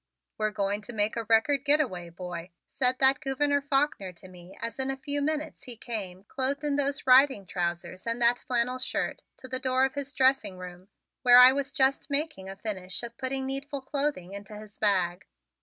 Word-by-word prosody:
"We're 215 Hz, 0 st, +1 dB
going 205 Hz, 0 st, -2 dB
to 240 Hz, -, -10 dB
make 210 Hz, 0 st, 0 dB
a 230 Hz, -1 st, -3 dB
record 235 Hz, +5 st, +3 dB
get 295 Hz, +1 st, +4 dB
away, 180 Hz, -, -3 dB
boy," 175 Hz, 0 st, -7 dB, 0.2 s
said 255 Hz, -1 st, +1 dB
that 265 Hz, 0 st, +4 dB
Gouverneur 285 Hz, 0 st, 0 dB
Faulkner 275 Hz, -9 st, 0 dB
to 180 Hz, -, -14 dB
me 180 Hz, 0 st, -14 dB
as 230 Hz, +2 st, -5 dB
in 265 Hz, 0 st, 0 dB
a 270 Hz, -, -2 dB
few 285 Hz, +1 st, -2 dB
minutes 310 Hz, +1 st, -3 dB
he 245 Hz, -2 st, -3 dB
came, 195 Hz, -6 st, -5 dB
clothed 275 Hz, +6 st, -2 dB
in 290 Hz, -1 st, 0 dB
those 280 Hz, -1 st, -1 dB
riding 260 Hz, -5 st, +5 dB
trousers 175 Hz, +2 st, -4 dB
and 230 Hz, +1 st, -1 dB
that 240 Hz, +1 st, +3 dB
flannel 250 Hz, 0 st, 0 dB
shirt, 255 Hz, -, -3 dB, 0.2 s
to 260 Hz, -, -11 dB
the 255 Hz, 0 st, -2 dB
door 260 Hz, 0 st, +2 dB
of 270 Hz, -, -3 dB
his 285 Hz, -1 st, -5 dB
dressing 260 Hz, -8 st, +2 dB
room, 180 Hz, 0 st, -10 dB, 0.3 s
where 245 Hz, -1 st, +7 dB
I 250 Hz, +1 st, +10 dB
was 280 Hz, 0 st, -3 dB
just 270 Hz, +1 st, +1 dB
making 280 Hz, -10 st, -2 dB
a 195 Hz, -, -7 dB
finish 195 Hz, -1 st, -4 dB
of 235 Hz, -, -7 dB
putting 265 Hz, 0 st, -1 dB
needful 275 Hz, +1 st, -3 dB
clothing 275 Hz, -9 st, -2 dB
into 200 Hz, +1 st, -9 dB
his 210 Hz, -1 st, -13 dB
bag. 185 Hz, -3 st, +1 dB
250 Hz, 200 wpm, -28 LUFS, 195-275 Hz, 0.3 s, I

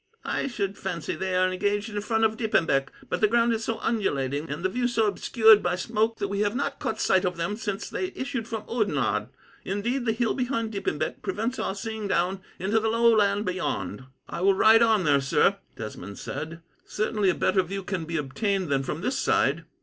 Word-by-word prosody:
I -, -, -1 dB
should 200 Hz, -6 st, -3 dB
fancy 170 Hz, -4 st, -3 dB
they 190 Hz, -1 st, -2 dB
are 185 Hz, 0 st, +4 dB
engaged 205 Hz, +3 st, -1 dB
in 205 Hz, 0 st, -2 dB
front 225 Hz, +1 st, 0 dB
of 220 Hz, 0 st, +3 dB
Diepenbeck; 165 Hz, -, +1 dB, 0.2 s
but -, -, -2 dB
the 215 Hz, -, +6 dB
ground 235 Hz, +1 st, +3 dB
is 225 Hz, 0 st, -2 dB
so 225 Hz, 0 st, -2 dB
undulating, 145 Hz, -, -1 dB
and 150 Hz, +5 st, -4 dB
the -, -, +3 dB
view 245 Hz, +4 st, 0 dB
so 230 Hz, -2 st, +1 dB
obscured 220 Hz, +1 st, +5 dB
by 175 Hz, 0 st, 0 dB
smoke, 220 Hz, +4 st, 0 dB
that 200 Hz, -, -2 dB
we 200 Hz, 0 st, -3 dB
have 205 Hz, +2 st, +1 dB
not 280 Hz, +1 st, -2 dB
caught 220 Hz, -, -3 dB
sight 190 Hz, -1 st, +3 dB
of 180 Hz, -1 st, -1 dB
them 170 Hz, +5 st, -2 dB
since 210 Hz, -2 st, -4 dB
they 370 Hz, -, -2 dB
issued 260 Hz, -4 st, -3 dB
from 225 Hz, -2 st, -4 dB
Oudenarde 220 Hz, -3 st, 0 dB, 0.3 s
indeed, 235 Hz, +6 st, -2 dB
the -, -, +4 dB
hill 225 Hz, +1 st, 0 dB
behind 245 Hz, -4 st, -1 dB
Diepenbeck 215 Hz, -, -2 dB
prevents 250 Hz, -, -2 dB
our 190 Hz, -, -2 dB
seeing 220 Hz, 0 st, -4 dB
down 185 Hz, +1 st, 0 dB, 0.2 s
into 200 Hz, +5 st, +1 dB
the 220 Hz, 0 st, 0 dB
low 230 Hz, 0 st, +4 dB
land 205 Hz, 0 st, +2 dB
beyond." 130 Hz, -, -3 dB, 0.2 s
"I -, -, -5 dB
will 195 Hz, +1 st, +4 dB
ride 220 Hz, +3 st, +6 dB
on 220 Hz, -4 st, +4 dB
there, 145 Hz, -3 st, +3 dB
sir," 165 Hz, +8 st, +3 dB, 0.2 s
Desmond 100 Hz, -2 st, -7 dB
said. 160 Hz, +4 st, -6 dB, 0.2 s
"Certainly 210 Hz, -2 st, 0 dB
a 180 Hz, -, +2 dB
better 190 Hz, -, +2 dB
view 195 Hz, +2 st, -5 dB
can 185 Hz, -3 st, -3 dB
be 165 Hz, +1 st, -3 dB
obtained 185 Hz, -, -1 dB
than 135 Hz, -1 st, +2 dB
from 150 Hz, +4 st, -4 dB
this 260 Hz, +6 st, -1 dB
side." -, -, +1 dB
205 Hz, 210 wpm, -26 LUFS, 180-225 Hz, 0.3 s, the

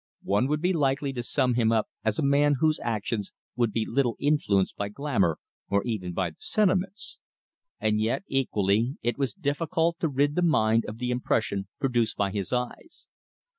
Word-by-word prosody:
One 105 Hz, +6 st, +2 dB
would 150 Hz, +1 st, 0 dB
be 185 Hz, +1 st, +3 dB
likely 140 Hz, -3 st, 0 dB
to 125 Hz, -, -3 dB
sum 125 Hz, +1 st, +1 dB
him 115 Hz, -2 st, +2 dB
up 110 Hz, -2 st, +2 dB, 0.2 s
as 110 Hz, -1 st, 0 dB
a -, -, 0 dB
man 145 Hz, +1 st, +4 dB
whose 155 Hz, 0 st, +2 dB
actions 110 Hz, -2 st, -2 dB, 0.2 s
would 120 Hz, -2 st, +1 dB
be 110 Hz, +1 st, -1 dB
little 120 Hz, -2 st, +1 dB
influenced 120 Hz, -10 st, +1 dB
by 100 Hz, 0 st, -3 dB
glamour 105 Hz, -, 0 dB, 0.3 s
or 100 Hz, 0 st, +2 dB
even 105 Hz, -7 st, -3 dB
by 90 Hz, -2 st, -1 dB
the 80 Hz, -, -23 dB
sentiments. 195 Hz, -1 st, 0 dB, 0.6 s
And 105 Hz, 0 st, +1 dB
yet, 115 Hz, -, 0 dB
equally, 115 Hz, -2 st, +1 dB
it 120 Hz, +3 st, -1 dB
was 135 Hz, +3 st, -1 dB
difficult 165 Hz, +1 st, 0 dB
to 165 Hz, -, 0 dB
rid 145 Hz, +1 st, +1 dB
the 180 Hz, -, 0 dB
mind 115 Hz, -9 st, +3 dB
of 105 Hz, -, -6 dB
the 125 Hz, +1 st, -2 dB
impression 110 Hz, -5 st, -1 dB
produced 120 Hz, -4 st, 0 dB
by 100 Hz, -1 st, 0 dB
his 100 Hz, -1 st, -3 dB
eyes. 125 Hz, -, -4 dB
125 Hz, 180 wpm, -27 LUFS, 110-145 Hz, 0.6 s, man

